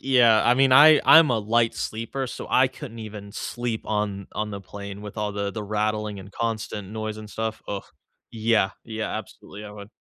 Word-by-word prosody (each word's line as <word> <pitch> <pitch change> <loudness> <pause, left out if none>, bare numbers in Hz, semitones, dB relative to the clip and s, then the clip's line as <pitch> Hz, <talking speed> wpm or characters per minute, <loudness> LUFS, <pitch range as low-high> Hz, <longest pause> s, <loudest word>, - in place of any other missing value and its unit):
Yeah, 120 -5 +5
I 120 - +5
mean, 135 0 +4
I 150 +2 +8
I'm 160 -4 +8
a 115 - +2
light 115 +2 +1
sleeper, 115 +5 -4
so, - - -7
I 130 0 +4
couldn't 130 -4 -10
even 105 -2 -9
sleep 120 -1 -4
on 105 -2 -2
on 105 0 -3
the 100 -1 -6
plane 100 +1 -9
with 105 0 -9
all 105 -1 -2
the 100 0 -2
the 110 +1 -5
rattling 105 -1 -2
and 95 +2 -12
constant 110 -3 -4
noise 110 0 -4
and 110 0 -9
stuff, 110 +1 -4
ugh. 100 -1 -4 0.5
Yeah, 110 -3 +1
yeah, 110 -1 -4
absolutely, 105 +2 -10
I 105 - -8
would. 100 -1 -10
110 Hz, 200 wpm, -24 LUFS, 105-115 Hz, 0.5 s, I